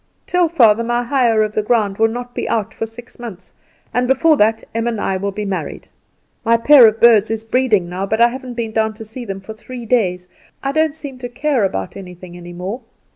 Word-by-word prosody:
"Tell 360 Hz, -1 st, +2 dB
father 230 Hz, -9 st, +4 dB
my 240 Hz, +1 st, 0 dB
hire 240 Hz, -4 st, +2 dB
of 215 Hz, 0 st, -3 dB
the 215 Hz, -, +1 dB
ground 210 Hz, -3 st, 0 dB
will 225 Hz, -, +5 dB
not 245 Hz, +2 st, -6 dB
be -, -, -4 dB
out 220 Hz, -3 st, -1 dB
for 225 Hz, -, -4 dB
six 230 Hz, +2 st, -13 dB
months, 210 Hz, -6 st, -9 dB, 0.4 s
and 245 Hz, +1 st, +1 dB
before 310 Hz, +4 st, +4 dB
that 220 Hz, 0 st, +2 dB
Em 230 Hz, +1 st, -1 dB
and 230 Hz, -3 st, -2 dB
I 195 Hz, -, -1 dB
will 200 Hz, +2 st, -2 dB
be 210 Hz, +1 st, -5 dB
married. 195 Hz, -2 st, -5 dB, 0.6 s
My 230 Hz, 0 st, +3 dB
pair 255 Hz, 0 st, +7 dB
of 220 Hz, +1 st, 0 dB
birds 225 Hz, -3 st, +5 dB
is 220 Hz, 0 st, -3 dB
breeding 225 Hz, -6 st, +1 dB
now, 185 Hz, +3 st, -4 dB
but 220 Hz, +2 st, -1 dB
I 235 Hz, 0 st, +6 dB
haven't 255 Hz, 0 st, -8 dB
been 230 Hz, -2 st, -3 dB
down 220 Hz, 0 st, 0 dB
to 225 Hz, -, -9 dB
see 235 Hz, +3 st, -8 dB
them 195 Hz, -2 st, -6 dB
for 220 Hz, +3 st, -8 dB
three 240 Hz, +2 st, -9 dB
days. 185 Hz, -7 st, 0 dB, 0.4 s
I 275 Hz, -, 0 dB
don't 315 Hz, 0 st, +1 dB
seem 280 Hz, -5 st, -8 dB
to 245 Hz, -1 st, -6 dB
care 265 Hz, -1 st, 0 dB
about 95 Hz, -, -4 dB
anything 180 Hz, -2 st, -10 dB
any 175 Hz, 0 st, -10 dB
more. 185 Hz, +7 st, -5 dB
225 Hz, 230 wpm, -18 LUFS, 205-245 Hz, 0.6 s, pair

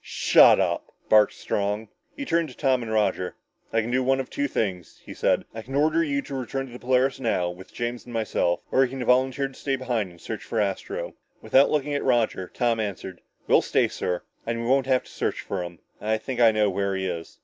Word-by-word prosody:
"Shut -, -, +6 dB
up!" -, -, -1 dB, 0.2 s
barked 105 Hz, -1 st, +5 dB
Strong. 105 Hz, +2 st, -2 dB, 0.3 s
He 285 Hz, -, -4 dB
turned 170 Hz, -, +1 dB
to 125 Hz, -, -14 dB
Tom 130 Hz, -3 st, +2 dB
and 115 Hz, -2 st, -5 dB
Roger. 105 Hz, -4 st, 0 dB, 0.4 s
"I 115 Hz, -, +2 dB
can 115 Hz, +2 st, -4 dB
do 130 Hz, +1 st, +2 dB
one 135 Hz, +1 st, +2 dB
of 135 Hz, -, -5 dB
two 285 Hz, 0 st, -1 dB
things," 95 Hz, -, -3 dB
he -, -, -8 dB
said. -, -, +1 dB
"I 110 Hz, -, -6 dB
can 135 Hz, +4 st, -7 dB
order 155 Hz, +3 st, +3 dB
you 140 Hz, -3 st, -1 dB
to -, -, -9 dB
return 135 Hz, +1 st, -3 dB
to 130 Hz, -, -13 dB
the 125 Hz, -, -8 dB
Polaris 130 Hz, +1 st, +1 dB
now, 90 Hz, -8 st, 0 dB
with 90 Hz, +1 st, -12 dB
James 120 Hz, 0 st, -4 dB
and 120 Hz, -, -11 dB
myself, 110 Hz, -6 st, 0 dB
or 135 Hz, -, +5 dB
you 130 Hz, -, 0 dB
can 130 Hz, -1 st, -5 dB
volunteer 130 Hz, +2 st, +2 dB
to 135 Hz, -, -15 dB
stay 135 Hz, +1 st, -2 dB
behind 120 Hz, -6 st, -2 dB
and 85 Hz, -1 st, -17 dB
search 110 Hz, +3 st, -6 dB
for 115 Hz, -, -2 dB
Astro." 400 Hz, -, -2 dB, 0.3 s
Without 135 Hz, +1 st, +4 dB
looking 150 Hz, -1 st, 0 dB
at 145 Hz, -, -1 dB
Roger, 115 Hz, -7 st, +1 dB
Tom 120 Hz, -2 st, 0 dB
answered, 95 Hz, -3 st, -5 dB, 0.2 s
"We'll -, -, +5 dB
stay, -, -, +2 dB
sir. 90 Hz, 0 st, -3 dB, 0.2 s
And 115 Hz, 0 st, -2 dB
we 115 Hz, -, -3 dB
won't 135 Hz, +1 st, +3 dB
have 130 Hz, -1 st, +2 dB
to -, -, -16 dB
search -, -, -2 dB
for 95 Hz, -, -4 dB
him. 85 Hz, -1 st, -8 dB, 0.2 s
I 110 Hz, +1 st, +1 dB
think 125 Hz, +3 st, -5 dB
I 115 Hz, -2 st, +7 dB
know 110 Hz, -1 st, +2 dB
where 100 Hz, 0 st, -1 dB
he 95 Hz, 0 st, -2 dB
is." 85 Hz, -3 st, -5 dB
120 Hz, 235 wpm, -25 LUFS, 105-135 Hz, 0.4 s, I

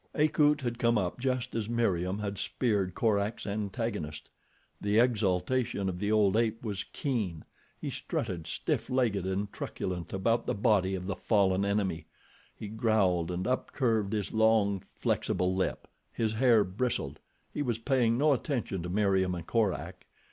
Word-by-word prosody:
Akut 150 Hz, -1 st, +3 dB
had 120 Hz, -2 st, -3 dB
come 115 Hz, -1 st, +3 dB
up 95 Hz, +2 st, -1 dB
just 130 Hz, -1 st, -1 dB
as 110 Hz, -1 st, -2 dB
Meriem 95 Hz, -6 st, 0 dB
had 100 Hz, -2 st, -4 dB
speared 100 Hz, -7 st, 0 dB
Korak's 105 Hz, -1 st, 0 dB
antagonist. 100 Hz, -6 st, -3 dB, 0.5 s
The 105 Hz, +1 st, +1 dB
exultation 110 Hz, -1 st, +1 dB
of 90 Hz, -1 st, -3 dB
the 105 Hz, +1 st, 0 dB
old 105 Hz, -2 st, +4 dB
ape 115 Hz, 0 st, 0 dB
was 100 Hz, -3 st, -2 dB
keen. 105 Hz, -, -3 dB, 0.3 s
He -, -, -4 dB
strutted, 90 Hz, -7 st, -3 dB
stiff -, -, -2 dB
legged 115 Hz, -8 st, +1 dB
and 100 Hz, +2 st, -2 dB
truculent 90 Hz, -2 st, -4 dB
about 115 Hz, +5 st, 0 dB
the 125 Hz, -, 0 dB
body 100 Hz, -3 st, +2 dB
of 90 Hz, -1 st, -5 dB
the 100 Hz, -1 st, -2 dB
fallen 95 Hz, 0 st, +2 dB
enemy. 100 Hz, -6 st, -1 dB, 0.5 s
He 105 Hz, -, -7 dB
growled 100 Hz, -6 st, +1 dB
and 90 Hz, +1 st, -2 dB
upcurved 115 Hz, -4 st, 0 dB
his 105 Hz, -2 st, -2 dB
long, 110 Hz, -3 st, +3 dB
flexible 90 Hz, 0 st, 0 dB
lip. 95 Hz, -, -2 dB, 0.2 s
His 110 Hz, -2 st, -1 dB
hair 115 Hz, -2 st, +5 dB
bristled. 95 Hz, -, -2 dB, 0.3 s
He -, -, -2 dB
was 120 Hz, -5 st, 0 dB
paying 115 Hz, -1 st, +2 dB
no 145 Hz, +2 st, +4 dB
attention 120 Hz, -, -2 dB
to 90 Hz, -, -5 dB
Meriem 95 Hz, -2 st, +2 dB
and 85 Hz, -2 st, -6 dB
Korak. 110 Hz, -4 st, -1 dB
105 Hz, 155 wpm, -30 LUFS, 95-115 Hz, 0.5 s, hair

